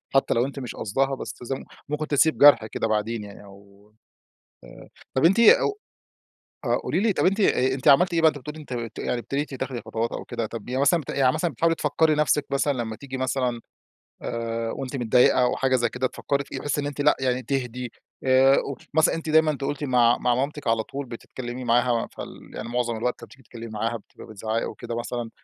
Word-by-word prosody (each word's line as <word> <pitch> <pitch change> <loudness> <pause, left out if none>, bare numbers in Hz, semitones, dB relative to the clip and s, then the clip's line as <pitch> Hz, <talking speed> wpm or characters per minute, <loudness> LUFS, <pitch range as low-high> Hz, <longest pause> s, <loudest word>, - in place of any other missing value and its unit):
حتى 135 - +3
لو 120 +2 +2
أنتِ 140 +1 -6
مش 125 -3 -6
قاصْداها 135 +6 0
بس - - -6 0.6
ممكن 150 +1 -2
تسيْب 155 +2 +3
جرْح 145 -6 +7
كده، 110 - -2
بعدين 110 +1 -1
يعني 100 0 -11
أو 100 +1 -18 0.7
آآ، - - -13 0.3
طَب 130 - +2
أنتِ 195 +7 +4
أو 410 - +5 0.9
آآ - - +2
قولي - - -1
لي 220 0 +2
طَب - - +1
أ 130 -9 +3
أنتِ 130 - 0
عملتِ 175 +6 +5
إيه 165 - +2
بعد 160 -1 +6
ما - - -7
بتقولي 150 +4 -8
أنتِ 145 -4 -10
أنتِ 115 -2 -5
يعني 125 - -1
ابتديتِ 140 +4 -3
تاخدي 130 -2 -4
خطوات 115 0 -3
أو - - -5
كده، 115 - -3
طَب 115 0 -8
يعني 130 +2 -1
مثلًا 145 +5 +4
يعني 130 -2 +2
مثلًا 165 +2 0
بتحاولي 165 +5 +1
تفكّري 155 0 +2
نفْسِك 150 -1 +2
مثلًا 140 +1 +1
لما 115 -4 -4
تيجي 135 +1 -7
مثلًا 130 -2 -1 0.6
آآ 115 -1 -3
وأنتِ 135 0 -5
متضايقة 125 +1 +4
أو 125 - +2
حاجة 130 -1 +2
زي 120 -1 +1
كده 125 +2 -2
تفكّري 140 +2 -2
فيه، - - -7
تحسّي 145 0 -1
إن 145 - -4
أنتِ 145 0 -5
لأ، 150 +1 +4
يعني 130 -1 0
تهدِي 125 -1 -3 0.3
آآ، 130 +1 +5 0.4
مثلًا 160 0 +4
أنتِ 165 -1 -5
دايمًا، 160 0 +5
أنتِ 140 -2 -4
قُلتِ 145 +1 -3
مع 120 -3 +3
مع 125 -1 +1
مامتِك 140 +3 -3
على 115 -1 +2
طول، 140 +4 -6
بتتكلّمي 120 +1 -7
معاها 120 0 +2
فال - - -10
يعني - - -6
معظم 120 -1 -1
الوقت 125 +3 -2
لما - - -8
بتيجي 135 - -18
تتكلمي 115 0 -10
معاها 115 +2 -2
بتبقى 110 - -14
بتزعّقي 110 +1 -3
وكده 120 -1 -6
مثلًا 120 -1 -4
130 Hz, 210 wpm, -25 LUFS, 115-145 Hz, 0.9 s, جرْح